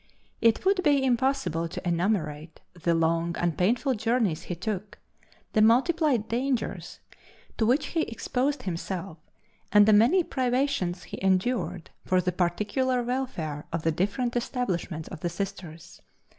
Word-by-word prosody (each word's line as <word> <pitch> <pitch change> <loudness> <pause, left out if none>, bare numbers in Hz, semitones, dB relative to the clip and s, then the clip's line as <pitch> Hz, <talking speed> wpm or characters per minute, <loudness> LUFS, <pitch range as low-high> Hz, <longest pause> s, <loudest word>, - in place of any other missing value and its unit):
It 230 +8 +3
would 385 -1 +3
be 290 -5 +3
impossible 245 - 0
to 175 - -6
enumerate 165 -4 -1
the 170 -1 0
long 165 +1 +1
and 175 -2 0
painful 245 +8 +1
journeys 225 -7 0
he 175 - -5
took, 200 +2 -4 0.6
the 215 - +4
multiplied 255 +1 +3
dangers 250 +2 -2 0.6
to 220 - +3
which 255 +6 +3
he 330 - +2
exposed 260 +3 -2
himself, 180 -1 -4 0.5
and 210 0 +7
the 215 - +5
many 245 - +5
privations 255 - -1
he - - -8
endured 190 -1 0
for 185 - +2
the 180 0 0
particular 210 +9 0
welfare 235 - -3
of 165 -1 -3
the 165 - +2
different 205 - -1
establishments 190 - -2
of 175 - -8
the 175 - -2
Sisters. 175 -3 -7
205 Hz, 140 wpm, -27 LUFS, 175-250 Hz, 0.6 s, and